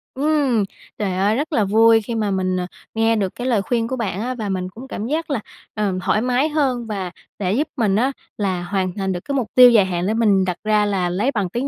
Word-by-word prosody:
Ừm. 275 Hz, -5 st, +2 dB, 0.3 s
Trời 200 Hz, -3 st, -1 dB
ơi 200 Hz, +4 st, +1 dB
rất 300 Hz, +4 st, -2 dB
là 220 Hz, -, +3 dB
vui 225 Hz, +3 st, +5 dB
khi 230 Hz, +2 st, -5 dB
mà 210 Hz, -3 st, 0 dB
mình, 185 Hz, -1 st, 0 dB
à, 180 Hz, -, -3 dB, 0.3 s
nghe 225 Hz, 0 st, +3 dB
được 195 Hz, -4 st, -2 dB
cái 250 Hz, +1 st, -4 dB
lời 225 Hz, -6 st, +2 dB
khuyên 230 Hz, +2 st, -1 dB
của 260 Hz, -, -2 dB
bạn 205 Hz, -4 st, -3 dB
á 255 Hz, +2 st, -3 dB
và 215 Hz, -4 st, -4 dB
mình 185 Hz, -1 st, -2 dB
cũng 245 Hz, +7 st, -11 dB
cảm 220 Hz, -3 st, -5 dB
giác 320 Hz, +3 st, -2 dB
là, 275 Hz, -, 0 dB, 0.3 s
ờ, 210 Hz, -3 st, -1 dB
thoải 215 Hz, -, +2 dB
mái 255 Hz, +5 st, +1 dB
hơn 265 Hz, -6 st, 0 dB
và 190 Hz, -4 st, -4 dB, 0.3 s
để 195 Hz, -1 st, 0 dB
giúp 290 Hz, +7 st, 0 dB
mình 210 Hz, -5 st, +2 dB
á 255 Hz, +5 st, +2 dB, 0.3 s
là 190 Hz, -4 st, -1 dB
hoàn 185 Hz, -1 st, -1 dB
thành 195 Hz, -2 st, -2 dB
được 175 Hz, -, -2 dB
cái 280 Hz, -, -2 dB
mục 245 Hz, -5 st, 0 dB
tiêu 250 Hz, -1 st, +9 dB
dài 210 Hz, -5 st, +5 dB
hạn 180 Hz, 0 st, -2 dB
để 215 Hz, -, +1 dB
mình 205 Hz, -4 st, +3 dB
đặt 180 Hz, -1 st, -2 dB
ra 215 Hz, -1 st, +2 dB
là 190 Hz, -3 st, 0 dB
lấy 210 Hz, +10 st, 0 dB
bằng 205 Hz, -7 st, -1 dB
tiếng 245 Hz, +7 st, -2 dB
215 Hz, 255 wpm, -21 LUFS, 190-245 Hz, 0.3 s, tiêu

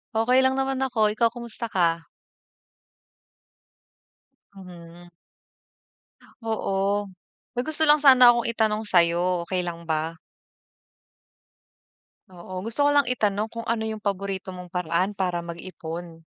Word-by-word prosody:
Okey 250 Hz, +4 st, +3 dB
lang 260 Hz, 0 st, +2 dB
naman 270 Hz, 0 st, -1 dB
ako. 220 Hz, -5 st, +1 dB
Ikaw, 230 Hz, 0 st, +2 dB
kumusta 235 Hz, -1 st, -7 dB
ka? 165 Hz, -5 st, 0 dB, 2.4 s
Mhm. 175 Hz, -2 st, -13 dB, 1.3 s
Oo, 205 Hz, -3 st, -1 dB, 0.5 s
may 245 Hz, -, +1 dB
gusto 315 Hz, 0 st, 0 dB
lang 300 Hz, 0 st, +5 dB
sana 255 Hz, -4 st, +8 dB
akong 235 Hz, 0 st, -1 dB
itanong 220 Hz, -2 st, 0 dB
sa'yo, 175 Hz, -1 st, +2 dB
okey 185 Hz, +1 st, -2 dB
lang 170 Hz, 0 st, -6 dB
ba? 160 Hz, +1 st, -3 dB, 2.1 s
Oo, 185 Hz, +1 st, -8 dB
gusto 230 Hz, +7 st, +2 dB
ko -, -, +5 dB
lang 285 Hz, -3 st, +3 dB
itanong 215 Hz, -3 st, 0 dB
kung 230 Hz, 0 st, -7 dB
ano 230 Hz, -1 st, -1 dB
yung 220 Hz, -, -4 dB
paborito 195 Hz, -1 st, -3 dB
mong 180 Hz, -1 st, -10 dB
paraan 180 Hz, +3 st, -1 dB
para 180 Hz, -2 st, -1 dB
mag-ipon? 170 Hz, -1 st, -8 dB
195 Hz, 115 wpm, -24 LUFS, 175-230 Hz, 2.4 s, sana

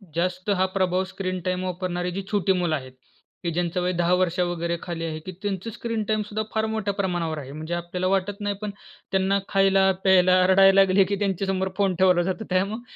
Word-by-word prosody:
जास्त 180 Hz, +3 st, -1 dB
हा 190 Hz, -, +4 dB
प्रभाव 185 Hz, -1 st, +1 dB
स्क्रीन 185 Hz, -1 st, -3 dB
टाईम 185 Hz, 0 st, -1 dB
वापरणारी 180 Hz, 0 st, -3 dB
जी 195 Hz, +2 st, -4 dB
छोटी 200 Hz, -2 st, +2 dB
मुलं 175 Hz, -4 st, 0 dB
आहेत, 130 Hz, -2 st, -7 dB, 0.5 s
की 170 Hz, -, -1 dB
ज्यांचं 175 Hz, +1 st, -1 dB
वय 180 Hz, +1 st, 0 dB
10 175 Hz, +1 st, +1 dB
वर्ष 180 Hz, -1 st, +1 dB
वगैरे 170 Hz, -1 st, -1 dB
खाली 165 Hz, -2 st, -4 dB
आहे, 155 Hz, -1 st, -4 dB
की 185 Hz, +4 st, -8 dB
त्यांचं 205 Hz, +1 st, -3 dB
स्क्रीन 230 Hz, 0 st, -3 dB
टाईम 215 Hz, -1 st, +1 dB
सुद्धा 215 Hz, +1 st, -2 dB
फार 220 Hz, 0 st, +2 dB
मोठ्या 200 Hz, -2 st, -1 dB
प्रमाणावर 175 Hz, -5 st, -2 dB
आहे. 135 Hz, -2 st, -7 dB
म्हणजे 155 Hz, +3 st, -6 dB
आपल्याला 175 Hz, +1 st, -2 dB
वाटत 195 Hz, +2 st, -1 dB
नाही 205 Hz, 0 st, -1 dB
पण 210 Hz, -1 st, -3 dB, 0.4 s
त्यांना 190 Hz, +1 st, +2 dB
खायला, 195 Hz, 0 st, +4 dB
प्यायला, 185 Hz, -1 st, +5 dB
रडायला 195 Hz, +1 st, +6 dB
लागले 195 Hz, 0 st, +4 dB
की 200 Hz, +2 st, -1 dB
त्यांच्यासमोर 190 Hz, -1 st, -1 dB
फोन 195 Hz, -3 st, +1 dB
ठेवला 180 Hz, -2 st, +5 dB
जातो, 190 Hz, +4 st, -3 dB
त्यामुळे 200 Hz, +5 st, 0 dB
185 Hz, 200 wpm, -24 LUFS, 175-195 Hz, 0.5 s, रडायला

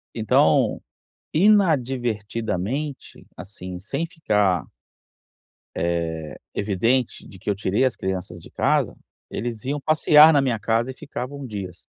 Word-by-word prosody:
Então, 110 Hz, -2 st, +3 dB, 0.5 s
inadvertidamente, 130 Hz, -, 0 dB
assim, 90 Hz, 0 st, -8 dB
sem 115 Hz, -, -3 dB
ficar 105 Hz, -, +1 dB, 1.1 s
Eh, 85 Hz, +1 st, 0 dB, 0.6 s
evidente 115 Hz, +5 st, 0 dB
de 95 Hz, -, -13 dB
que 100 Hz, -, -6 dB
eu 100 Hz, -, +1 dB
tirei 100 Hz, +5 st, 0 dB
as 130 Hz, -, +1 dB
crianças 95 Hz, -2 st, -4 dB
de -, -, -14 dB
casa, -, -, +1 dB, 0.3 s
eles 115 Hz, -1 st, -5 dB
iam 145 Hz, +2 st, -1 dB
passear 155 Hz, +1 st, +6 dB
na 145 Hz, -3 st, +4 dB
minha 125 Hz, -4 st, 0 dB
casa 115 Hz, +4 st, 0 dB
e -, -, -10 dB
ficavam 140 Hz, +1 st, -7 dB
dias. 95 Hz, -6 st, -7 dB
115 Hz, 120 wpm, -23 LUFS, 95-140 Hz, 1.1 s, passear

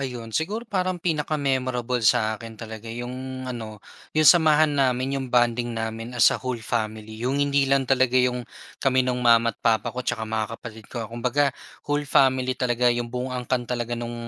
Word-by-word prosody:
Ayon, 120 Hz, -4 st, -5 dB
siguro 195 Hz, -, -2 dB
parang 185 Hz, -6 st, -2 dB
pinaka-memorable 135 Hz, -6 st, -1 dB
sa 110 Hz, -1 st, +3 dB
akin 115 Hz, 0 st, -9 dB
talaga 110 Hz, 0 st, -9 dB
'yong 130 Hz, +3 st, -6 dB
ano, 110 Hz, -4 st, -7 dB, 0.3 s
'yong 155 Hz, -1 st, +6 dB
samahan 155 Hz, -3 st, +5 dB
namin, 130 Hz, +1 st, +1 dB
'yong 135 Hz, -, -4 dB
bonding 120 Hz, 0 st, +2 dB
namin 115 Hz, +2 st, -4 dB
as 120 Hz, -2 st, +6 dB
a -, -, -1 dB
whole 130 Hz, -2 st, -3 dB
family. 110 Hz, -1 st, -3 dB
'Yong 130 Hz, +5 st, 0 dB
hindi 140 Hz, -1 st, +2 dB
lang 135 Hz, -1 st, +1 dB
talaga 130 Hz, -1 st, +3 dB
'yong 125 Hz, -1 st, +2 dB, 0.3 s
kami 130 Hz, -1 st, +2 dB
no'ng 125 Hz, 0 st, -1 dB
mama't 115 Hz, -2 st, +3 dB
papa 110 Hz, -2 st, +1 dB
ko 125 Hz, -, -9 dB
at 125 Hz, -, -9 dB
tsaka 120 Hz, -2 st, -1 dB
mga 110 Hz, 0 st, -1 dB
kapatid 110 Hz, -2 st, -10 dB
ko. 115 Hz, -3 st, -6 dB
Kumbaga 125 Hz, +5 st, +1 dB, 0.3 s
whole 145 Hz, 0 st, -1 dB
family 130 Hz, -2 st, +3 dB
talaga 125 Hz, -1 st, 0 dB
'yong 120 Hz, -1 st, +1 dB
buong 125 Hz, +1 st, -4 dB
angkan 125 Hz, 0 st, -2 dB
talaga 120 Hz, -1 st, -3 dB
no'ng 120 Hz, 0 st, -5 dB
125 Hz, 180 wpm, -24 LUFS, 115-135 Hz, 0.3 s, yong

